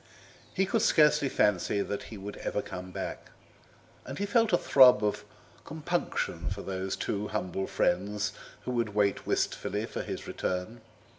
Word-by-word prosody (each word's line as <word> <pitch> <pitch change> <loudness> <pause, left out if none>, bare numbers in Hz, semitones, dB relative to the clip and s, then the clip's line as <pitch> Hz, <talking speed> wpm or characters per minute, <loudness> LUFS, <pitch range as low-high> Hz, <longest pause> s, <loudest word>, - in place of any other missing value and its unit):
He 190 - +1
could 225 +3 +1
scarcely 150 -5 +4
fancy 100 -1 +2
that 100 - -4
he 110 - -8
would 100 +1 -7
ever - - -2
come 90 0 -7
back, 95 +1 -6 0.7
and 135 - -7
he 200 - -1
felt 225 +2 +3
a 175 - +5
throb 125 -9 +6
of 105 - 0 0.4
compunction 160 +3 -2
for - - -5
those 95 0 -3
two 105 +1 -2
humble 95 -2 -3
friends 105 +4 0 0.3
who - - -3
would 115 -4 -1
wait 100 -1 +1
wistfully - - -1
for - - -5
his - - -5
return. 95 +6 -3
105 Hz, 155 wpm, -29 LUFS, 95-145 Hz, 0.7 s, throb